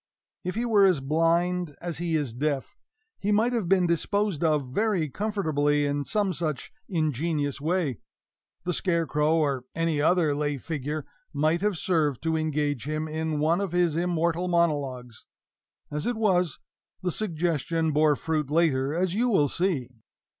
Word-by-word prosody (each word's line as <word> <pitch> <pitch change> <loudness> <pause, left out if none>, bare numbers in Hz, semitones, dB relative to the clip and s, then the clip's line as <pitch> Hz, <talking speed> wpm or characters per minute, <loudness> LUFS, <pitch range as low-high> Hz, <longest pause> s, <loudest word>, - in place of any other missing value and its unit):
If 180 +1 -3
he 235 +2 -1
were 215 -4 +4
as 185 -6 +4
blind 165 +3 +1
as 170 -3 -5
he 170 -1 -1
is 145 -7 -1
deaf, 140 +2 -2 0.4
he 205 - 0
might 225 +4 +3
have 220 -8 -1
been 190 -2 +4
disposed 175 +1 0
of 150 -4 +2
very 205 -6 +1
comfortably 150 -8 0
in 145 0 -1
some 205 -3 0
such 155 -7 -3 0.2
ingenious 150 - -1
way 160 - 0 0.6
the 180 +1 -1
scarecrow, 165 -3 +1
or 140 -5 0
any 165 -3 0
other 160 -1 +3
lay 145 0 -1
figure, 150 +1 -4 0.3
might 155 +4 +1
have 205 -3 0
served 155 - 0
to 160 -1 +1
engage 150 -5 -1
him 155 +1 -2
in 155 0 -2
one 165 +5 +2
of 195 -4 -3
his 175 -3 +2
immortal 170 0 0
monologues. 140 -9 -1 0.6
As 150 +5 -2
it 245 - 0
was, 180 -7 +1 0.5
the 180 - 0
suggestion 165 -4 -1
bore 150 0 +4
fruit 155 -1 -2
later, 150 -3 +2
as 180 0 0
you 240 +5 +1
will 150 -10 +3
see. 170 -9 0
160 Hz, 155 wpm, -26 LUFS, 150-180 Hz, 0.6 s, were